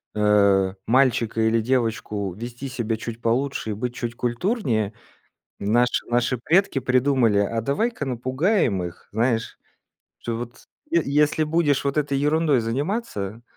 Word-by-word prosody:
э, 100 -2 +3
мальчика 120 -3 +2
или 110 +1 +2
девочку 110 -5 -1
вести 120 +6 -7
себя 120 -4 -2
чуть 115 +1 -7
получше 120 0 -1
и - - -1
быть 120 +4 -4
чуть 120 -2 -4
культурнее. 120 - -1 0.7
Наши 120 +5 +2
наши 120 +1 0
предки 165 +1 +2
придумали: 125 -4 +2
"А 115 +3 0
давай-ка 150 - -1
напугаем 130 - 0
их, 85 -1 -8
знаешь, 115 +1 0 0.6
что 115 -1 -4
вот, 120 0 -8 0.3
е 335 - +3
если 150 +2 +2
будешь 150 -3 +1
вот 140 +1 -1
этой 145 -2 0
ерундой 150 -1 +2
заниматься, 115 - -3
120 Hz, 135 wpm, -23 LUFS, 110-140 Hz, 0.7 s, э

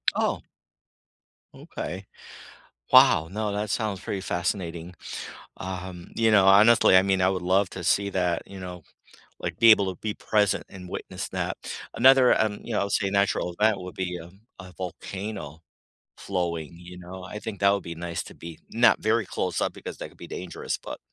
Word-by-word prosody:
Oh. - - 0 1.1
Okay. 95 +2 -7 0.9
Wow. 80 +1 +7
No, 105 +1 -2
that 105 0 -2
sounds 105 -3 -1
pretty 95 - -4
fascinating. 90 -1 -3 0.6
Um, 90 -1 -7
you 115 -1 +3
know, 100 -3 +5
honestly, 100 0 +7
I 95 - +7
mean, 95 -1 +1
I 90 - +4
would 95 -2 -1
love 95 +2 +2
to 95 - -7
see 100 +3 +2
that, 90 -3 0
you 100 -1 -10
know, 90 -1 -8 0.6
like, - - -5
be 115 -1 +8
able 100 -3 +4
to - - -21
be 110 -1 -2
present 105 -2 +1
and 90 -1 -10
witness - - -6
that. - - -3 0.4
Another, 130 0 +6
um, 105 -2 0
you 120 - -5
know, 105 - +1
I - - +2
would 100 - -4
say 100 - +1
natural 100 -3 +1
event 105 -2 +3
would 90 0 -8
be, 90 -1 -3
um, 90 +5 -14 0.2
a 90 -1 -10
volcano 95 -3 -6 0.6
flowing, 85 -5 -3
you 90 +1 -11
know, 90 +1 -9
I 100 +4 -7
think 105 -2 -6
that 100 - +5
would 100 0 -1
be 85 - -6
nice 85 0 -4
to - - -12
be 85 -1 -10
not - - +4
very - - +1
close-up - - -2
because - - -8
that - - -7
could - - -22
be - - -10
dangerous, 90 -1 -4
but - - -8
95 Hz, 185 wpm, -26 LUFS, 90-100 Hz, 1.1 s, be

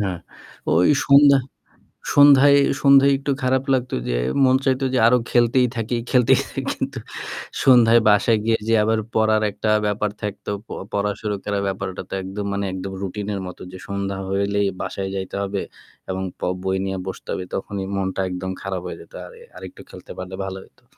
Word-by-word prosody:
হ্যাঁ, 95 -4 -2 0.6
ওই 90 - +4 0.2
সন্ধ্যা 140 0 +6 0.8
সন্ধ্যায় 140 0 +7 0.2
সন্ধ্যায় 140 0 +6
একটু 140 +1 -3
খারাপ 130 +1 +1
লাগতো 125 -1 -1
যে - - 0 0.3
মন 130 0 +5
চাইতো 135 0 +1
যে - - +2
আরো 125 +1 +5
খেলতেই 125 +1 +3
থাকি, 115 +1 -2
খেলতেই 125 0 +4
থাকি। 135 - -5
কিন্তু 135 -1 -4 0.6
সন্ধ্যায় 120 -3 +6
বাসায় 105 +2 +3
গিয়ে 115 0 +2
যে 115 - +2
আবার 110 +1 +1 0.2
পড়ার 110 -1 +3
একটা 105 +2 -3 0.2
ব্যাপার 105 0 0
থাকতো। 105 0 -5 0.2
প - - -56 0.2
পড়া 105 0 0
শুরু 105 -1 -2
করার 100 -1 -2
ব্যাপারটা 95 -1 -4
তো - - -7
একদম 100 +2 -5 0.2
একদম 95 +1 -5
রুটিনের 100 +1 -4
মতো 90 - -10
যে 95 - -9
সন্ধ্যা 100 -1 -3
হইলেই 100 +1 0
বাসায় 95 0 -4
যাইতে 95 -1 -5
হবে 100 0 -3 0.5
এবং 95 0 -3 0.2
প - - -29 0.2
বই 95 0 0
নিয়ে 95 0 -3
বসতে 95 - -7
হবে। 90 - -4
তখনই 95 0 -4
মনটা 95 0 -2
একদম 90 +1 -4
খারাপ 95 -2 -4
হয়ে - - -6
যেত। - - -17
আর - - -12 0.3
আরেকটু - - -10
খেলতে - - -12
পারলে 95 0 -6
ভালো 95 0 -5
হইতো। - - -25
105 Hz, 175 wpm, -21 LUFS, 95-125 Hz, 0.8 s, সন্ধ্যায়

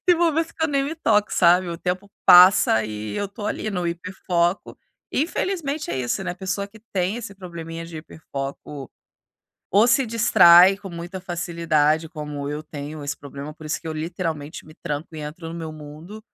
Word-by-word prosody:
Tem 355 - +6
momentos 330 -1 +1
que 320 - -1
eu - - +1
nem 280 -1 +1
me 285 +4 -3
toco, 215 -9 +2
sabe? 180 +1 +4
O 170 - -4
tempo 180 +3 -3
passa 180 - +7
e 105 -1 -5
eu 205 - -2
tô 205 +2 -9
ali 215 - -3
no 180 -3 -2
hiperfoco. 175 +1 -1 0.4
Infelizmente 310 -1 -2
é - - -2
isso, 120 -2 -2
né? - - -2
A - - -5
pessoa 195 +2 -3
que 220 +2 -17
tem 185 +3 0
esse 235 -4 -7
probleminha 165 -3 -7
de 165 -1 -8
hiperfoco, 140 -3 -7 0.8
ou 205 +5 +5
se 250 +3 +4
distrai 195 -5 +7
com 195 -1 -9
muita 175 +2 -7
facilidade, 165 -3 0
como 150 -2 -6
eu 150 +1 -5
tenho 150 0 -7
esse 140 0 -3
problema. 140 +1 -9
Por 155 - -14
isso 150 - -2
que - - -12
eu 160 - -3
literalmente 155 -2 -4
me 155 - -14
tranco 155 0 -5
e 155 - -6
entro 150 +3 -7
no 165 - -7
meu 165 -2 -6
mundo, 155 +7 -10
170 Hz, 190 wpm, -23 LUFS, 155-200 Hz, 0.8 s, passa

